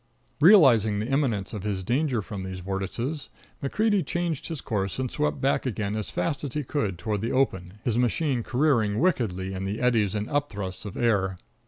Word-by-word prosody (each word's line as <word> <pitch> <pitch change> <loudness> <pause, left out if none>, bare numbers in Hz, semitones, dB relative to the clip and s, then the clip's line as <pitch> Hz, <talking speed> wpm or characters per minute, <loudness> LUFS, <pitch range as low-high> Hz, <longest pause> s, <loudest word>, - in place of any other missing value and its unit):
Realizing 135 - +6
the 105 - -1
imminence 120 -7 0
of 105 - -4
his 100 -2 -2
danger 125 - 0
from 95 +2 -6
these 95 0 -6
vortices, 100 - -3 0.3
MacCreedy 205 +7 +1
changed 165 -1 -2
his 160 -4 -4
course 100 -6 -2
and 130 -2 -2
swept 75 0 -1
back 135 0 +1
again 105 -3 -2
as 110 -1 -3
fast 150 -4 -2
as 140 -2 -5
he 150 - 0
could 110 - -2
toward 105 +1 -2
the 115 - -1
open, 95 -9 0
his 120 -1 +1
machine 125 +1 +1
careering 120 -5 +2
wickedly 95 - 0
in 95 0 -4
the 100 +4 -3
eddies 115 -5 +2
and 105 0 -2
upthrusts 105 -10 -3
of 100 - -6
air. 95 -6 +1
115 Hz, 185 wpm, -26 LUFS, 100-140 Hz, 0.3 s, Realizing